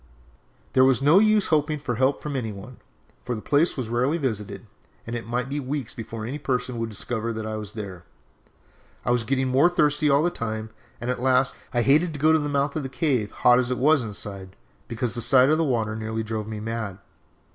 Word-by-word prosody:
"There 130 - +5
was 135 0 +3
no 155 +7 +6
use 215 -1 +4
hoping 150 0 +2
for 140 -4 -3
help 130 +4 +1
from 150 -2 -4
any 115 -5 -2
one, 105 +5 -10 0.5
for 125 - -3
the 110 - -6
place 150 +3 +2
was 125 -4 -3
rarely 125 +7 +1
visited, 105 -7 -4 0.4
and 115 - -5
it 115 -1 -5
might 120 +1 -2
be 140 +2 -3
weeks 135 -2 -4
before 115 -1 -6
any 135 +6 -4
person 125 -3 -2
would 115 0 -2
discover 115 +2 -3
that 110 -1 -5
I 110 0 -3
was 105 -1 -6
there. 95 -5 -7 1.0
I - - +1
was 120 -1 +2
getting 130 +2 0
more 135 +7 +5
thirsty 150 -3 +2
all 140 +2 +4
the 175 - +1
time, 110 -3 -4 0.3
and, 120 +2 -2
at 125 - -4
last, 130 0 +2 0.2
I 120 -1 +1
hated 155 +6 +3
to - - -6
go 155 +2 +4
to 160 - +4
the 145 -1 -2
mouth 140 0 0
of 155 - -1
the 135 - -5
cave, 130 -6 0
hot 125 +3 +4
as 125 -1 0
it 125 - -1
was 150 +1 +4
inside, 100 -3 -7 0.3
because 115 0 -3
the 120 - -2
sight 130 +3 +5
of 155 +1 +3
the - - +3
water 115 -7 0
nearly 110 0 -3
drove 110 -1 -4
me 110 -1 -5
mad. 110 -3 -4
125 Hz, 225 wpm, -25 LUFS, 110-140 Hz, 1.0 s, no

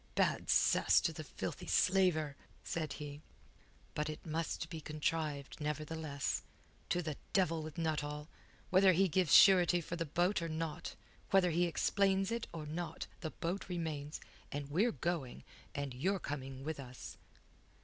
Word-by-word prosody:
"Bad - - +1
cess - - +5
to - - 0
the - - -6
filthy - - -5
slaver!" 180 -6 +3 0.3
said 155 -4 -2
he. 145 0 -7 0.7
"But 150 0 -1
it 155 - -7
must 165 0 -2
be 160 -2 -5
contrived, 150 -2 -2
nevertheless. 150 -1 -2 0.5
To 175 - +1
the 155 -3 -3 0.2
devil 165 -4 +2
with 155 -1 -8
Nuttall! 150 -2 -2 0.4
Whether 190 0 +6
he 190 +3 +4
gives 180 -1 +1
surety 180 -3 +8
for 170 +1 -5
the 165 - -1
boat 175 +5 +1
or 165 - -2
not, 160 -1 -4 0.3
whether 190 -2 +4
he 175 +2 +3
explains 195 +3 +2
it 235 0 -2
or 160 -2 -6
not, 160 +1 -4
the 160 - -3
boat 180 +5 -4
remains, 155 -4 -3 0.3
and 145 0 -4
we're 205 +10 +3
going, 160 - -3 0.3
and 140 -2 -3
you're 185 +11 0
coming 135 -5 -5
with 155 0 -4
us." 125 -2 -9
160 Hz, 150 wpm, -35 LUFS, 150-175 Hz, 0.7 s, surety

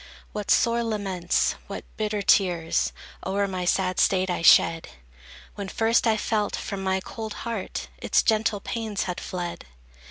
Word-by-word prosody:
What 210 -1 -5
sore 235 0 +3
laments, 195 -6 0
what - - -7
bitter 210 -1 -2
tears 175 -5 +2 0.3
O'er 200 +1 0
my 185 -2 -3
sad 185 0 +1
state 185 -1 +3
I 175 - -2
shed, 165 0 +5 0.7
When 200 -1 -6
first 225 +4 +2
I 220 -1 +3
felt 210 -1 0
from 200 -2 -5
my 190 0 0
cold 220 +2 -6
heart 230 -5 -4
Its - - +2
gentle 215 -2 +1
pains 220 -3 -3
had 180 -1 -4
fled! 175 -2 -5
200 Hz, 150 wpm, -25 LUFS, 185-220 Hz, 0.7 s, shed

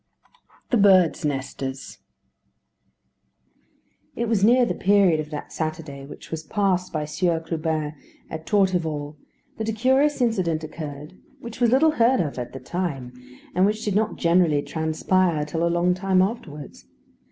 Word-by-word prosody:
V 485 - -36 0.3
THE 245 - +4
BIRDS' 185 -5 +4
NESTERS 135 -1 -4 2.2
It 235 - -2
was 215 -3 +1
near 245 +3 +5
the - - -1
period 195 -5 +3
of 155 -1 -4
that 150 -1 -7
Saturday 155 -3 -5
which 145 - -12
was 160 -1 -3
passed 185 +1 0
by 155 -1 -2
Sieur 165 +2 0
Clubin 160 -2 -2 0.3
at 160 0 -8
Torteval 165 -7 0 0.4
that 220 0 -2
a - - -1
curious 265 +6 +2
incident 185 -10 0
occurred, 150 +1 -8 0.2
which 235 -1 -9
was 240 - +5
little 285 +6 +4
heard 250 -2 +3
of 145 -6 -2
at 120 - -5
the 135 - -7
time, 135 -4 -4 0.4
and 185 +3 +3
which 215 +1 -2
did 205 - 0
not 215 +2 +1
generally 170 -4 +2
transpire 160 0 0
till 160 +3 -2
a 170 - +2
long 175 +1 +2
time 185 0 +2
afterwards. 155 - -6
170 Hz, 150 wpm, -24 LUFS, 155-205 Hz, 2.2 s, near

